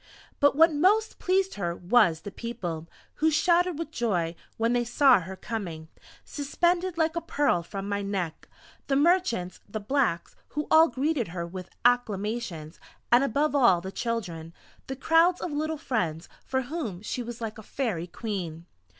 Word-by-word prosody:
But 285 -1 +4
what 325 +2 +6
most 405 +9 +2
pleased 380 +1 +1
her 170 -3 -3
was 175 -4 +3
the 205 - -7
People, 190 -8 -5 0.3
who 315 - +3
shouted 345 +2 +2
with 325 -1 -5
joy, 185 - -1 0.2
when 230 +1 +1
they 245 0 +2
saw 245 0 +5
her 185 +2 -7
coming, 175 -8 -6 0.4
suspended 345 +5 0
like 320 0 +1
a 335 - -1
Pearl 290 - +1
from 195 +3 -6
my 200 0 -1
neck! 190 -5 -4 0.4
The 275 - +1
merchants, 280 - +2
the 215 - -4
blacks, 210 -6 0
who 300 +1 -3
all 320 +1 +8
greeted 280 -4 -1
her 170 0 -4
with 180 +1 -8 0.2
acclamations 210 -8 0 0.3
and 240 +3 +6
above 285 +4 +1
all 240 -11 +5
the 190 +2 -7
children, 175 -9 -4 0.3
the 265 - -4
crowds 330 +6 +3
of 345 - -4
little 310 +2 -2
friends, 180 - -2 0.2
for 260 0 -1
whom 240 - -5
she 245 - -3
was 240 -1 -7
like 225 -1 -5
a - - -8
Fairy 210 -8 -3
Queen. 175 -5 -5
235 Hz, 165 wpm, -27 LUFS, 185-300 Hz, 0.4 s, all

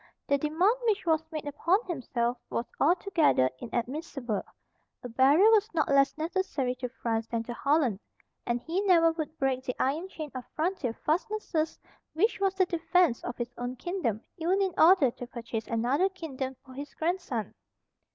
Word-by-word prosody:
The 280 0 +2
demand 320 +9 +3
which 405 -3 +1
was 320 -1 +2
made 310 -2 -5
upon 335 +6 +2
himself 245 -7 -2
was 235 - -2
altogether 325 - +3
inadmissible. 240 - -3 0.6
A 245 - -5
barrier 275 - +5
was 435 0 +3
not 310 - +1
less 275 +1 +3
necessary 315 -6 -1
to 250 -1 -4
France 230 -3 -2
than 230 -1 -2
to 240 - -6
Holland; 275 -6 +1 0.4
and 240 0 -1
he 335 +9 -2
never 330 -3 +6
would 315 -1 -5
break 265 -2 0
the 250 -2 -3
iron 305 +8 0
chain 310 -5 -7
of 255 -1 -5
frontier 315 -7 -1
fastnesses 330 -1 -1 0.4
which 410 +8 +1
was 390 -1 +1
the 380 -1 +3
defence 340 -5 +2
of 245 - -5
his 240 0 -4
own 245 +1 -3
kingdom, 255 - -2 0.2
even 355 +4 +1
in 385 -2 +1
order 320 -6 +6
to 245 - -9
purchase 230 -2 -5
another 250 +11 +1
kingdom 270 -8 -5
for 260 - -13
his 285 +3 -8
grandson. 320 - -2
295 Hz, 165 wpm, -29 LUFS, 245-350 Hz, 0.6 s, never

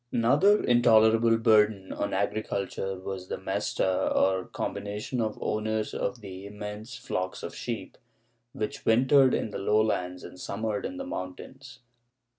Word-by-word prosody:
^ - - -48
Another 150 - +4
intolerable 115 -1 +5
burden 105 -3 +3
on - - -2
agriculture 95 -1 -2
was 95 -1 -6
the - - -4
Mesta, 95 -1 -1
or 95 -1 +2
combination 105 +5 -4
of 110 -1 -2
owners 110 0 -1
of 125 -1 -3
the 95 -1 -8
immense 105 +4 -7
flocks 95 -7 -4
of - - -5
sheep, - - -6 0.5
which 105 -2 -4
wintered 130 +3 +5
in 110 - -2
the - - -5
lowlands 100 -3 0
and 90 - -10
summered 105 +2 -3
in 275 - -8
the 270 - -5
mountains. 130 - -8
110 Hz, 140 wpm, -28 LUFS, 100-120 Hz, 0.5 s, intolerable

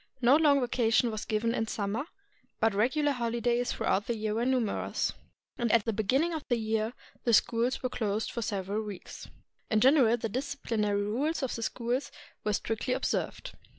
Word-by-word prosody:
No 250 +2 +6
long 295 -3 +5
vacation 240 -1 +2
was 215 -1 -4
given 225 +1 0
in 225 -2 -1
summer, 215 +5 -2 0.5
but 225 - +3
the 200 - -3
regular 290 +6 +2
hoHdays 240 -1 0
throughout 205 - 0
the 235 - -1
year 215 0 -1
were 235 +3 0
numerous, 250 -5 0 0.5
and 235 -2 +1
at 230 -3 +4
the 225 - 0
beginning 265 - +1
of 315 -3 -3
the 240 - +3
year 220 +1 -1 0.3
the 235 - +2
schools 235 +4 +1
were 255 - 0
closed 215 -3 -2
for 235 - -3
several 205 -1 -2
weeks. 205 -4 -8 0.4
In 215 - +3
general 255 -2 +5
the 225 - -2
disciplinary 220 -4 -1
rules 275 +10 -1
of 260 - -1
the 230 - -4
schools 240 +3 -2 0.3
were 210 - 0
strictly 225 +5 -1
observed. - - -2
230 Hz, 180 wpm, -30 LUFS, 215-255 Hz, 0.5 s, No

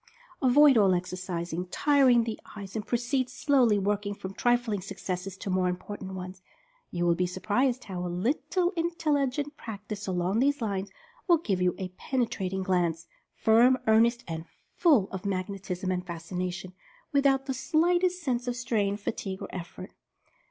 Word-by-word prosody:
Avoid 270 -1 +6
all 195 -3 +5
exercises 180 -1 -3
tiring 265 -2 +4
to 230 - -2
the - - -8 0.2
eyes, 200 -1 -8
and 215 - -2
proceed 250 +2 0
slowly, 255 -7 +3
working 205 +1 -1
from 190 -1 -7
trifling 240 -3 +1
successes 190 -1 -5
to 195 - -4
more 185 -1 +2
impor 205 +3 -7
tant 190 -1 -7
ones. 185 0 -7 0.5
You 175 0 -1
will 170 - +4
be 180 +1 0
surprised 240 +8 0
how 185 -3 -5
a 180 - -2 0.2
little 350 +6 +1
intelli 330 -6 0
gent 290 +2 -4
practice 210 -2 -7
along 185 +3 0
these 285 +3 +2
lines 200 -4 -2 0.4
will 345 -2 +6
give 195 - -1
you 180 0 +2
a 185 -1 -4
pene 260 -3 0
trating 190 -3 -3
glance, 170 -3 0 0.3
firm, 235 +4 +5
earnest, 230 +2 +4
and 165 -1 -5 0.3
full 280 - +4
of 190 -1 -5
"magnetism" 185 -1 -3
and 180 -1 -1
Fascination, 180 +1 -5 0.4
without 275 -2 +3
the 270 - -2
slightest 350 +6 +1
sense 250 -3 -1
of 245 - -1
strain, 215 -5 0
fatigue 195 -2 -4
or - - -6
effort. 180 +1 -8
205 Hz, 165 wpm, -28 LUFS, 185-255 Hz, 0.5 s, Avoid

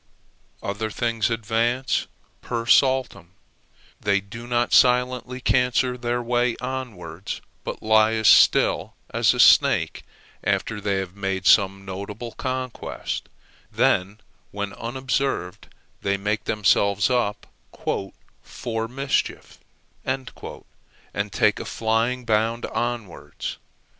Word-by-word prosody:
Other 105 +2 -3
things 115 -1 0
advance 115 +3 0 0.3
per 115 -1 -3
saltum 130 - +2 0.7
they 100 -1 +2
do 115 +5 -10
not 120 0 0
silently 125 0 +3
cancer 125 0 +2
their 120 0 -2
way 120 0 +1
onwards, 105 -9 -5 0.2
but - - -6
lie 110 0 +4
as 110 -1 +1
still - - +5 0.2
as - - +3
a - - -5
snake - - +5 0.4
after 110 -2 -1
they 100 -1 0
have 95 -1 -4
made 95 -2 -3
some 95 -1 +4
notable 100 +5 -6
conquest, 130 -1 -4 0.4
then 100 +3 +1 0.3
when 100 0 -4
unobserved 125 -5 -2 0.3
they 100 0 0
make 105 +2 -2
themselves 100 +1 +2
up 120 -5 0 1.0
"for 115 -2 -4
mischief," 135 +3 -2 0.4
and 130 0 -3 1.0
take - - +2
a - - -5
flying 115 +3 0
bound 115 +1 +1
onwards. 120 -6 -4
115 Hz, 105 wpm, -24 LUFS, 100-125 Hz, 1.0 s, still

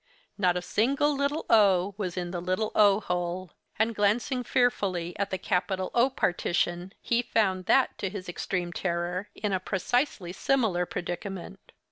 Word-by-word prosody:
Not 180 -3 +2
a 180 - -3
single 280 +10 +1
little 280 +3 -1
o 200 -3 +4
was 190 -4 -4
in 175 -1 -3
the 175 -1 -3
little 185 +5 -1
o 205 -1 +5
hole; 180 -1 -3 0.3
and, 225 +2 +2
glancing 225 +5 +1
fearfully 200 -10 0
at 200 - 0
the 190 - -2
capital 185 0 -1
O 240 +2 +4
partition, 175 -4 -1
he 235 0 +1
found 190 -6 0
that, 265 -1 +4
to 195 - -1
his 190 -1 -7
extreme 175 0 -3
terror, 180 +3 -2
in 210 -2 -2
a 190 - +1
precisely 190 - -1
similar 200 -7 +1
predicament. 190 +2 -6
190 Hz, 155 wpm, -28 LUFS, 180-220 Hz, 0.3 s, o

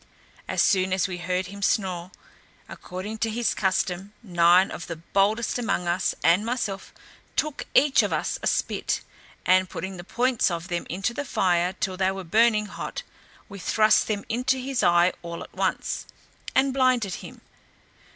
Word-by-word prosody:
As - - +2
soon 185 -1 +2
as 190 +1 +1
we 180 -2 -5
heard 180 +1 -1
him 200 +2 -9
snore, 185 -4 0 0.6
according 200 +5 -7
to 225 - 0
his 235 +2 0
custom, 190 0 -1
nine 175 -1 +4
of - - -7
the 165 - -4
boldest 200 +8 0
among 225 -7 -1
us, 175 +2 0
and 175 +5 +4
myself, 220 -5 -3 0.4
took 305 -2 -1
each 280 0 +5
of - - -1
us - - -1
a - - -1
spit, - - 0 0.4
and 185 0 +4
putting 190 0 -5
the 175 - -8
points 245 +4 +1
of 170 +1 -4
them 175 -1 -3
into 195 +7 -2
the 290 - -3
fire 180 -7 +1
till 185 -1 -3
they 190 0 +2
were 190 0 -4
burning 215 +4 +3
hot, 205 - -6 0.4
we 200 - -10
thrust 215 +4 +3
them 205 -2 -2
into 250 +3 0
his 260 0 -2
eye 175 +1 +4
all 170 -1 -6
at - - -14
once, - - -2 0.5
and 265 0 +3
blinded 255 -7 +2
him. - - -11
195 Hz, 170 wpm, -25 LUFS, 180-225 Hz, 0.6 s, each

